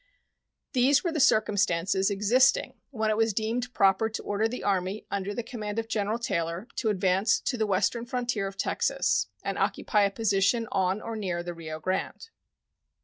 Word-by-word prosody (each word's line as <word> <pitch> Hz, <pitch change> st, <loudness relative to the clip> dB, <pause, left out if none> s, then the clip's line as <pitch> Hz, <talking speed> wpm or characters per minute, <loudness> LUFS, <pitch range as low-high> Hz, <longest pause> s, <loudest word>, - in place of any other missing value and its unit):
These 265 Hz, +2 st, +4 dB
were 345 Hz, -, 0 dB
the 315 Hz, -, -2 dB
circumstances 195 Hz, -6 st, +2 dB
existing 235 Hz, -, +3 dB, 0.2 s
when 220 Hz, -5 st, -1 dB
it 215 Hz, -, 0 dB
was 225 Hz, -2 st, +1 dB
deemed 235 Hz, +3 st, -2 dB
proper 195 Hz, 0 st, +3 dB
to 220 Hz, -, -6 dB
order 205 Hz, +2 st, 0 dB
the 250 Hz, +2 st, -6 dB
Army 195 Hz, +1 st, -1 dB
under 200 Hz, 0 st, -2 dB
the 235 Hz, +3 st, -4 dB
command 215 Hz, -3 st, -6 dB
of 225 Hz, 0 st, -2 dB
General 215 Hz, 0 st, -1 dB
Taylor 170 Hz, -3 st, -2 dB
to 225 Hz, -, 0 dB
advance 190 Hz, +1 st, +2 dB
to 255 Hz, -, -1 dB
the 220 Hz, -3 st, 0 dB
western 230 Hz, +5 st, 0 dB
frontier 240 Hz, -5 st, -1 dB
of 195 Hz, 0 st, -9 dB
Texas -, -, 0 dB, 0.2 s
and -, -, -3 dB
occupy 210 Hz, -, +1 dB
a 200 Hz, -, +4 dB
position 220 Hz, +2 st, +1 dB
on 190 Hz, +1 st, 0 dB
or 230 Hz, -, -5 dB
near 180 Hz, -5 st, -3 dB
the 175 Hz, 0 st, -5 dB
Rio 160 Hz, -2 st, -7 dB
Grande. 185 Hz, -, -3 dB
210 Hz, 175 wpm, -27 LUFS, 195-230 Hz, 0.2 s, These